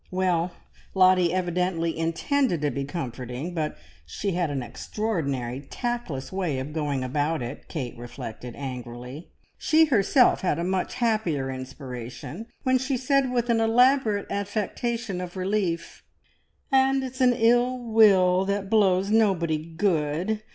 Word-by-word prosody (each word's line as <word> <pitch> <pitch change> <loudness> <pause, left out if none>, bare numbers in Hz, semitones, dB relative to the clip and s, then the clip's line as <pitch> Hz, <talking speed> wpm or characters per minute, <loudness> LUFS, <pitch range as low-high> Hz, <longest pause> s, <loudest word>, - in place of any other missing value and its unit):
Well, 180 -2 0 0.4
Lottie 185 -2 +5
evidently 175 -2 0
intended 165 - 0
to 145 -1 +1
be 140 +2 -3
comforting, 135 +1 -5
but 155 -3 -2 0.3
she 200 - -3
had 175 -2 0
an 135 -3 -2
extraordinary 140 - -3
tactless 240 - -4
way 180 -7 -1
of 135 +3 -5
going 145 -4 -1
about 145 +3 -1
it, 120 +3 -7
Kate 130 -8 -5
reflected 120 0 -8
angrily. 125 +2 -7 0.3
She 320 0 +4
herself 250 -1 +4
had 190 - +1
a 170 - -2
much 185 +1 -1
happier 200 - 0
inspiration, 130 - -7 0.2
when 255 -1 +3
she 260 +1 -1
said 265 +1 +1
with 240 -1 +1
an 230 - +3
elaborate 225 -2 +3
affectation 205 0 -2
of 180 +1 -7
relief 185 -3 -2 0.7
"And 270 0 +3
it's 260 0 -6
an 250 -1 +5
ill 245 +2 +3
wind 195 -6 +4
that 200 0 -2
blows 195 -2 +3
nobody 175 -8 +2
good! 175 +3 0
185 Hz, 135 wpm, -26 LUFS, 145-225 Hz, 0.7 s, Lottie